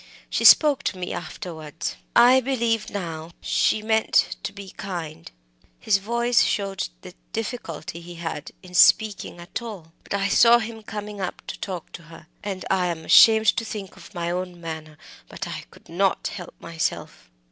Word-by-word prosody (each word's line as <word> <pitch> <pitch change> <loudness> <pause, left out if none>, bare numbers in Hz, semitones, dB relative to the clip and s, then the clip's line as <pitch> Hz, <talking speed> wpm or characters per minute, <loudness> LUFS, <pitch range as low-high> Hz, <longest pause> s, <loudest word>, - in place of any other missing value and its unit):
She - - 0
spoke 295 -3 +7
to 190 - -1
me 180 -1 -4
afterwards 165 -4 -6 0.2
I 245 +2 +7
believe 235 -4 0
now 165 -4 -6
she 215 - +1
meant 220 0 +2
to - - -4
be 200 -2 -10
kind" 170 - -6 0.5
his 195 -2 +2
voice 235 +3 +2
showed 195 -2 -1
the 180 - -10 0.2
difficulty 190 -8 -5
he 175 +1 -10
had 165 -3 -5
in 180 -1 -13
speaking 205 0 +4
at 175 +7 -6
all 195 -9 -9
"but - - -4
I 200 0 +1
saw 235 +4 +6
him 225 -1 -6
coming 210 -1 -7
up 185 - -4
to - - -7
talk 180 -4 -6
to - - -9
her. 165 -1 -13 0.2
I 190 -2 -1
am 165 -2 -4
ashamed 220 -1 +7
to - - 0
think 210 -3 -7
of - - -15
my 170 0 -2
own 180 0 -4
manner, 160 -2 -7 0.3
but - - -6
I - - -6
could - - -19
not 190 +3 0
help 180 -4 -9
myself." 165 -1 -4
195 Hz, 170 wpm, -24 LUFS, 170-220 Hz, 0.5 s, spoke